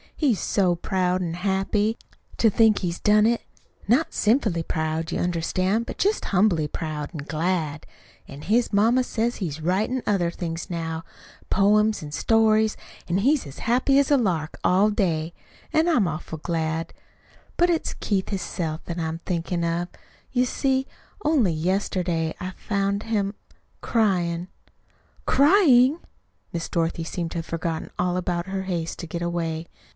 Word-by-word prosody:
He's 255 - +1
so 185 -2 +2
proud 185 0 0
an' 165 -2 -3
happy 195 +4 0 0.4
to 225 - +5
think 220 0 +4
he's 175 -2 -3
done 210 0 +4
it 235 +1 +2 0.5
not 285 +9 +2
sinfully 210 -6 +2
proud, 160 +1 -2
you - - -1
understand, 185 +5 0
but - - -6
just 410 +3 +1
humbly 180 -6 +2
proud 150 -1 -4
an' 155 - -5
glad. 160 -1 -1 0.4
An' 140 +1 -10
his 230 +3 +2
ma 210 +3 +4
says 240 -1 -1
he's 160 -6 -4
writin' 200 +10 0
other 190 -5 +1
things 165 -1 -5
now 165 -2 -3 0.5
poems 210 +2 +3
an' 145 - -7
stories, 220 +4 +3 0.3
an' 175 +2 +1
he's 275 - +2
as 135 - -10
happy 255 +4 +2
as 280 - +2
a 285 - +6
lark 170 - -1
all 195 +4 +4
day. 170 -6 0 0.4
An' 315 +2 +3
I'm 245 - +3
awful 160 0 -5
glad. 160 0 -2 0.6
But 350 +1 +4
it's 330 - -1
Keith 195 -3 -1
hisself 170 -4 -3
that 170 0 -4
I'm 160 0 -3
thinkin' 170 0 -2
of. 170 +1 -1 0.4
You 250 0 +2
see, 265 +1 0 0.4
only 275 - +3
yesterday 175 -1 -1
I 185 +1 -4
found 200 +1 -1
him 205 -3 -1 0.5
cryin'." 180 -6 +1 0.8
"Crying!" 285 -3 +5 0.5
Miss 170 -1 -3
Dorothy 165 -1 -1
seemed 165 0 -4
to - - -4
have 165 - -5
forgotten 165 -1 -3
all 180 0 +1
about 175 0 -2
her 190 0 -3
haste 170 -3 -3
to 170 - -6
get 170 +2 -5
away. 170 -1 -2
185 Hz, 150 wpm, -24 LUFS, 165-220 Hz, 0.8 s, a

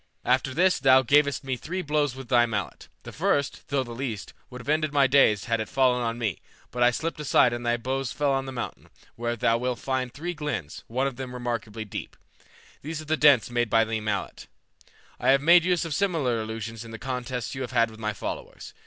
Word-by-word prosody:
After 130 +1 +2
this 180 +3 +3
thou 130 0 +6
gavest 140 +2 +3
me 135 -1 -2
three 180 +9 -4
blows 150 -4 0
with 135 -1 -9
thy 120 -1 +4
mallet; 105 -3 -4 0.2
the - - -8
first, 140 -1 -1
though 140 -2 0
the 120 - -10
least, 115 -4 -5 0.2
would 125 -1 -9
have 125 - -12
ended 155 0 +1
my 140 -2 +4
days 125 -7 +4
had 115 -2 0
it 110 - -4
fallen 130 -2 +2
on 115 -1 -2
me, 110 -7 -2 0.3
but 125 - -4
I 120 - +7
slipped 160 +6 -3
aside 130 -4 +3
and 120 0 -4
thy 120 0 +1
blows 130 +1 -2
fell 145 -2 0
on 135 0 -1
the - - -5
mountain, 120 -2 -6 0.3
where 120 0 -2
thou 115 0 +2
wilt 125 0 -1
find 130 -2 -2
three 170 +7 -5
glens, 145 - -5
one 130 +4 -1
of 135 -3 -3
them 130 -1 -6
remarkably 115 -3 -4
deep. 105 - -7 0.6
These 155 +2 -5
are 155 - -8
the 155 +1 +1
dints 145 -6 +5
made 120 -1 0
by 115 +1 +4
thy 110 0 -2
mallet. 105 -2 -4 0.7
I - - +1
have 135 +1 +5
made 170 +2 +7
use 180 -1 +1
of 165 - -3
similar 150 - 0
illusions 110 0 -6
in 115 - -11
the 110 - -7
contests 125 0 -4
you 130 - -5
have 125 - -3
had 115 -2 +2
with 110 - -13
my 110 -1 -2
followers. - - -7
125 Hz, 225 wpm, -26 LUFS, 115-140 Hz, 0.7 s, I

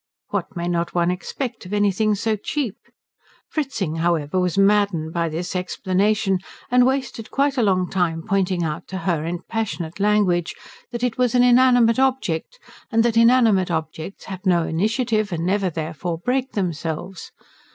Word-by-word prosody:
What 200 0 -3
may 170 0 -3
not 170 0 -1
one 175 0 +2
expect 235 +6 -5
of 195 - -7
anything 205 +1 +2
so 220 +2 0
cheap? 235 +1 -3 0.7
Fritzing, 230 - -2
however, 165 0 0
was 180 0 0
maddened 195 -5 +2
by 170 -1 0
this 170 +4 -4
explanation, 190 +2 0 0.3
and 250 0 +5
wasted 260 -4 -2
quite 280 0 +1
a 255 - +1
long 185 -4 +2
time 170 -4 -1
pointing 190 -3 +1
out 155 -2 -4
to 190 - -5
her 170 -4 -1
in 170 +2 -4
passionate 190 -6 -3
language 200 -4 +2 0.4
that 240 0 -4
it 250 -1 -1
was 250 -1 +2
an 245 - +5
inanimate 245 -1 +5
object, 265 - 0 0.3
and 225 -1 +3
that 235 -1 +1
inanimate 230 -5 +4
objects 160 +2 -4
have 190 -2 -7
no 175 -3 +3
initiative 215 +5 0
and 170 -1 -2
never 195 0 +1
therefore 165 +1 -4
break 255 +8 -1
themselves. 175 -1 -4
195 Hz, 160 wpm, -22 LUFS, 175-230 Hz, 0.7 s, and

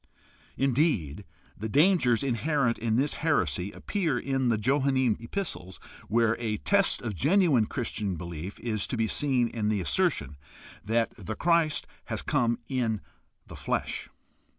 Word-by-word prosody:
Indeed, 130 - +1 0.3
the 110 +2 -5
dangers 145 - +4
inherent 135 -1 0
in 110 -1 0
this 140 +4 +2
heresy 90 - +1
appear 170 -11 -1
in 135 0 -1
the 115 - +2
Johannine 130 0 +2
epistles, 110 - -5 0.3
where 115 0 +2
a 110 -2 -1
test 200 - +2
of 110 -3 -3
genuine 145 - +3
Christian 105 -6 -3
belief 85 +3 -7
is 110 -3 -1
to 125 - -3
be 115 - +2
seen 130 -1 +1
in 110 -2 -2
the 105 -2 +1
assertion 75 -4 0 0.5
that 115 +2 0
the 110 +5 -4
Christ 165 +2 +2 0.2
has - - -3
come 120 -1 +1
in 115 -6 -1 0.4
the - - -11
flesh. - - -3
120 Hz, 140 wpm, -28 LUFS, 105-140 Hz, 0.5 s, dangers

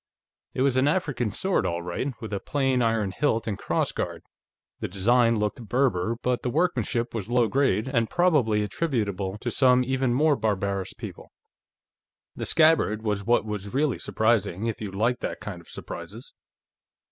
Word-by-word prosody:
It 130 - +1
was 135 -2 +2
an 130 +2 +3
African 145 - 0
sword, 190 - 0
all 85 -2 -2
right, 90 +11 -3
with 110 -2 -6
a 100 - -1
plain 135 -1 0
iron 115 -4 +1
hilt 115 -2 0
and 110 - -2
cross - - -1
guard. - - -4 0.6
The - - -3
design 115 +5 +3
looked 105 +2 -2
Berber, 115 -5 +1
but 125 -1 0
the 125 - -2
workmanship 120 - 0
was 110 -2 -4
low 120 -1 +3
grade, 130 -3 +1
and 115 -4 0
probably 140 -13 +2
attributable 105 - -2
to 120 +2 -4
some 125 -1 +4
even 130 0 0
more 145 +4 +3
barbarous 100 -4 -1
people. - - -9 1.0
The - - -4
scabbard 155 -10 +3
was 105 -2 -1
what 120 +2 +2
was 105 0 -5
really 145 -2 +1
surprising, 110 -3 0
if 115 -1 -3
you 105 - -3
liked 115 +6 0
that - - -4
kind - - -7
of - - -20
surprises. - - -8
115 Hz, 170 wpm, -26 LUFS, 105-130 Hz, 1.0 s, some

